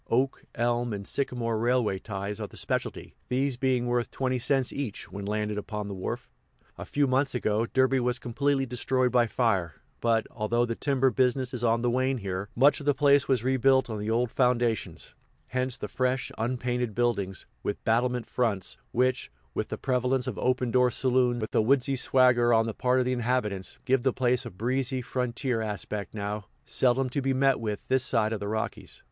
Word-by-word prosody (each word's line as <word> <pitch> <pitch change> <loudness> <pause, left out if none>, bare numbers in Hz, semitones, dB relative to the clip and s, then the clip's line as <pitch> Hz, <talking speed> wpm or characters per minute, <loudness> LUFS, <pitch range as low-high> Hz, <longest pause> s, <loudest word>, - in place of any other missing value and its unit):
Oak, 130 +3 0
elm, 120 0 0
and 100 -1 -5
sycamore 120 -4 -1
railway 120 -4 +1
ties 100 0 -5
are - - -4
the - - -13
specialty, - - -3 0.2
these 135 +1 +1
being 125 -1 +1
worth 120 -1 0
twenty 130 -1 -1
cents 135 +1 +1
each 130 -8 -5
when 100 0 -6
landed 105 0 -1
upon 105 0 -5
the 100 - -5
wharf. 95 -1 -4 0.5
A - - -7
few 145 0 +2
months 135 +1 +1
ago, 110 -1 0
Derby 130 +1 +2
was 125 0 0
completely 135 +3 0
destroyed 125 +1 0
by 120 -1 +4
fire, 95 -10 0 0.2
but, 115 -2 +2
although 120 +2 0
the 115 - -2
timber 135 +1 +1
business 130 0 +1
is 120 -2 -3
on 115 0 +2
the 120 - +2
wane 130 +2 +1
here, 95 -2 -4
much 140 +5 +5
of 145 - -8
the 145 - +4
place 140 -2 +4
was 130 -4 +2
rebuilt 130 -1 +3
on 110 - -3
the 105 +1 -3
old 115 +1 +1
foundations; 120 -3 0 0.4
hence 130 0 -1
the - - -5
fresh, 130 0 -1
unpainted 125 -1 -2
buildings, 105 -6 -1 0.2
with 100 - -4
battlement 120 +2 +1
fronts, 105 -7 -1
which, 130 +1 +1 0.2
with - - -2
the - - -5
prevalence 125 0 0
of - - -3
open 125 -1 +1
door 125 0 +4
saloons 125 -2 +2
and - - -1
a - - +4
woodsy 135 +3 +2
swagger 125 -2 +4
on 115 -1 +4
the 115 - -3
part 125 +3 +1
of 130 - +2
the 130 - +1
inhabitants, 115 -6 -1
give 130 0 +3
the 130 - +2
place 125 0 0
a - - -5
breezy, 130 +6 -1
frontier 125 -1 -2
aspect 105 -1 -4
now 105 -1 -4 0.2
seldom 130 +1 +2
to 135 +3 -2
be 135 0 0
met 135 0 +3
with 105 -2 -3
this 130 -1 +2
side 115 -4 +1
of 110 - -3
the 100 - -4
Rockies. 110 +1 -4
125 Hz, 195 wpm, -28 LUFS, 110-130 Hz, 0.5 s, much